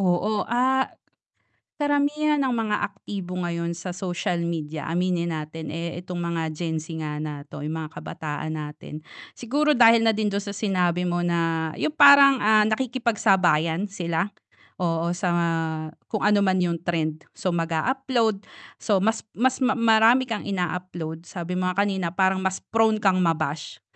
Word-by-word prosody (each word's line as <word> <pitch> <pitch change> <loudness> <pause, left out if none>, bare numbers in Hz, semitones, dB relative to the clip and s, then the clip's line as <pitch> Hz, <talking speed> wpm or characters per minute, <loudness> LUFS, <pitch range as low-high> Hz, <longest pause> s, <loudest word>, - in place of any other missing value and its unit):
oo, 195 +3 0
ah, 260 +2 +2 0.9
karamihan 290 +1 +1
ng 260 - 0
mga 225 -3 0 0.2
aktibo 185 -3 -6
ngayon 170 -1 -2
sa 175 +1 -6
social 175 -2 -2
media 155 -3 -4
aminin 175 0 0
natin, 155 0 -6
eh, 170 +1 -4
itong 180 0 -6
mga 165 -2 -2
Gen 160 +1 -3
Z 155 +2 -9
nga 150 -1 -4
na 145 -2 -6
'to, 145 - -8
yung 155 +2 -3
mga 160 0 -7
kabataan 155 0 -5
natin, 150 0 -7 0.3
siguro 290 +6 0
dahil 230 -4 +6
na 225 - +5
din 215 -1 -1
dun 200 0 -2
sa 200 - -5
sinabi 180 -3 0
mo 175 0 -1
na 165 -2 0
yung 310 - -1
parang, 280 -2 +8
ah, 215 0 +5
nakikipagsabayan 205 - +1
sila, 175 -3 -2 0.5
oo, 170 -2 0
sa 175 0 -1
mga 170 -1 +1 0.5
kung 215 - -3
ano 210 0 +4
man 185 0 +2
yung 170 -1 0
trend, 160 -3 -2
so, 185 - -2
mag-a-upload, 215 - 0 0.3
so, 200 -4 +1
mas 220 +2 0
mas 260 +3 +1
ma 260 0 +2
marami 230 +2 +4
kang 220 - -3
ina-upload, 180 -3 -4
sabi 180 -1 -5
mo 185 - 0
nga 195 +2 +1
kanina, 190 -4 -2
parang 190 0 +2
mas 190 0 -2
prone 220 -1 +2
kang 190 -2 +3
ma-bash, 155 -4 -1
180 Hz, 160 wpm, -24 LUFS, 165-220 Hz, 0.9 s, parang